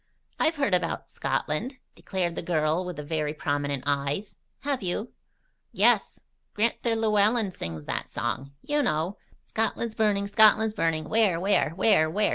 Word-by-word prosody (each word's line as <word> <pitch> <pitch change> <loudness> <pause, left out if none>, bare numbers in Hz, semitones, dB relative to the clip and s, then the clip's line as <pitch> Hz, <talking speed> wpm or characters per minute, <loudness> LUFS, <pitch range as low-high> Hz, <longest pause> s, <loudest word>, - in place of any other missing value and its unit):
"I've 320 +1 +2
heard 275 -9 0
about 180 - -1
Scotland," 245 - -2 0.2
declared 180 -3 -2
the - - -4
girl 160 0 +1
with 180 -1 -5
the 150 - -6
very 150 0 -2
prominent 145 -2 -2
eyes. 145 +8 -2 0.2
"Have 275 -2 -1
you?" 195 +5 -3 0.6
"Yes. - - +2 0.4
Gran'ther 230 +1 +1
Llewellen 215 -1 +2
sings 80 - -6
that - - -4
song. 135 +2 -3
You 295 0 +1
know: 175 - 0 0.3
"'Scotland's 225 +1 -1
burning! 210 -3 +1
Scotland's 215 +1 +5
burning! 165 -6 0
Where, 215 -6 +2
where? 195 -1 +2
Where, 190 -5 +4
where? 210 +6 +1
195 Hz, 145 wpm, -27 LUFS, 155-220 Hz, 0.6 s, Scotland's